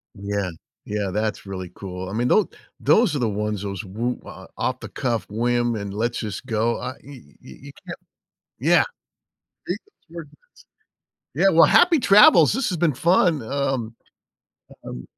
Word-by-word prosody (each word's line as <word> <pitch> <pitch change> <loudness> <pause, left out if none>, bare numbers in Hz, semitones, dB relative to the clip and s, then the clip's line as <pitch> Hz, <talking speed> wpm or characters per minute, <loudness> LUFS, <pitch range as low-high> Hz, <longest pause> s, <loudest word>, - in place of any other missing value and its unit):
Yeah. 100 -1 -3 0.4
Yeah, 105 -2 -3
that's 105 0 -2
really 95 -2 -6
cool. 95 -1 -7
I - - -7
mean, 120 +3 0
tho 215 - +3 0.3
those 220 -9 +3
are - - -1
the 120 -3 0
ones, 105 -1 -3
those 100 0 -5
woo 115 +6 -3
o - - -11
off - - -2
the - - -9
cuff 120 -4 -2
whim 120 +2 0
and 100 -2 -5
let's 115 +3 -2
just 105 +3 -5
go. 115 0 0
I 125 +1 -5
y - - -21
y 140 -1 -12 0.2
y 65 - -13
you 140 - -11
can't 170 - -7 0.6
Yeah. - - +4 0.8
Beat - - -2
the 415 - -30 0.2
coordinates. 165 -4 -10 1.0
Yeah, 195 - +3
well, 165 -2 +6
happy 350 -4 +5
travels, 195 - +6
this 265 +6 -1
has 180 - -2
been 165 -1 +2
fun, 170 +2 +2
um, 130 -2 -2 0.9
um, 60 0 -7
120 Hz, 170 wpm, -22 LUFS, 105-150 Hz, 1.0 s, well